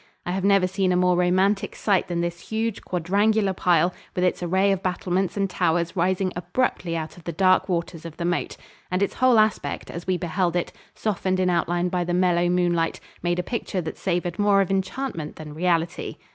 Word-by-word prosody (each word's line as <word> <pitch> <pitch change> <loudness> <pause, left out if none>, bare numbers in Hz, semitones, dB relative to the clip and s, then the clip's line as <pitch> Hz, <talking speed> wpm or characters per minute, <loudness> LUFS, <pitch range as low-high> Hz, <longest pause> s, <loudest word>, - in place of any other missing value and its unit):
I 175 - -2
have 190 +1 -2
never 195 -1 +4
seen 190 0 0
a - - +2
more 180 0 +3
romantic 185 +3 +2
sight 195 -4 +1
than 170 -1 -1
this 175 0 -5
huge, 220 -1 -2
quadrangular 200 +3 +1
pile, 175 -1 +2 0.2
with 180 - 0
its 180 - +1
array 190 +3 +2
of 195 -2 0
battlements 185 +1 -1
and 195 -1 +1
towers 170 -1 0
rising 185 +1 +1
abruptly 175 -1 -1
out 160 +1 -6
of 175 - -14
the 170 - -4
dark 185 +3 +3
waters 170 -2 -2
of 165 -2 -9
the 170 - -3
moat. 175 0 -1 0.3
And 185 +2 +1
its 200 - -1
whole 255 -2 +4
aspect, 215 -9 0
as 170 +1 -7
we 185 -1 +1
beheld 175 0 -1
it 175 - -1 0.2
softened 185 -3 -1
in 185 -1 +2
outline 175 +1 0
by 180 0 0
the 175 0 -1
mellow 175 -1 +2
moonlight 175 -2 +1 0.2
made 175 0 0
a 180 - -1
picture 215 -2 -3
that 160 - -5
savored 175 -1 -2
more 205 -1 +4
of 195 - -1
enchantment 190 - -3
than 150 -1 -9
reality. 170 +1 -1
180 Hz, 200 wpm, -24 LUFS, 175-195 Hz, 0.3 s, never